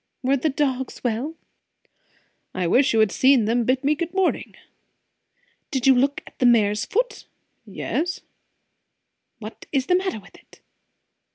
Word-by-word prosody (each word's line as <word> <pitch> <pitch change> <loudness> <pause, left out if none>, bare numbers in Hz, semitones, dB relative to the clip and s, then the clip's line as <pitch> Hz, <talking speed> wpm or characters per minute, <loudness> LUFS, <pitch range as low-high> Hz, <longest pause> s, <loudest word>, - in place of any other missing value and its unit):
"Were 265 +2 +2
the 275 +4 0
dogs 265 -2 -2
well?" 250 +7 -2 1.2
"I 185 - -1
wish 260 - +3
you 225 - +2
had 215 -3 +2
seen 260 -1 +4
them 235 +2 +1
bid 255 +2 +1
me 290 +2 +3
good 340 +4 -5
morning!" 380 -2 0 1.1
"Did 265 -2 -2
you 270 - +7
look 275 +3 0
at - - -17
the 250 - +4
mare's 210 -3 +3
foot?" - - -2 0.4
"Yes." 345 +2 -3 1.2
"What 220 -1 -10
is 270 -3 0
the 360 - +1
matter 370 - -1
with 200 - -18
it?" - - -20
265 Hz, 150 wpm, -23 LUFS, 230-300 Hz, 1.2 s, you